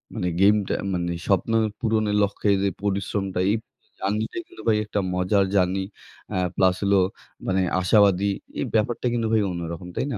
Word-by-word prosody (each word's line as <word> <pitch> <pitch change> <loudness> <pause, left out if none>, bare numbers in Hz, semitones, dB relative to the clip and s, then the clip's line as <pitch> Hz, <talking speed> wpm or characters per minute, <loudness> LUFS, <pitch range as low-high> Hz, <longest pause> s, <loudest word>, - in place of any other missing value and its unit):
মানে 90 -5 -1
গেমটা 100 0 +4 0.2
মানে 85 -1 -1 0.2
স্বপ্ন 95 +3 +1 0.3
পূরণের 110 -3 +1
লক্ষ্যে, 100 +1 -1
যে, 100 - +2
পরিশ্রমটা 95 -1 -1
এই 110 - +3 0.4
জার্নিটা 105 - -2
কিন্তু 355 - -13
ভাই 110 -1 +4
একটা 105 -1 -2
মজার 95 +2 +2
জার্নি। 95 +1 +2 0.5
অ্যা 95 - -1 0.2
প্লাস 95 -1 +3
হলো 100 0 +3 0.5
মানে 95 0 +2 0.2
আশাবাদী। 100 0 +4 0.3
এই - - 0
ব্যাপারটা 115 +3 0
কিন্তু 115 -2 0
ভাই 110 - +4
অন্যরকম। 85 0 -5
তাই - - -1
না? - - -3
100 Hz, 160 wpm, -24 LUFS, 95-105 Hz, 0.5 s, গেমটা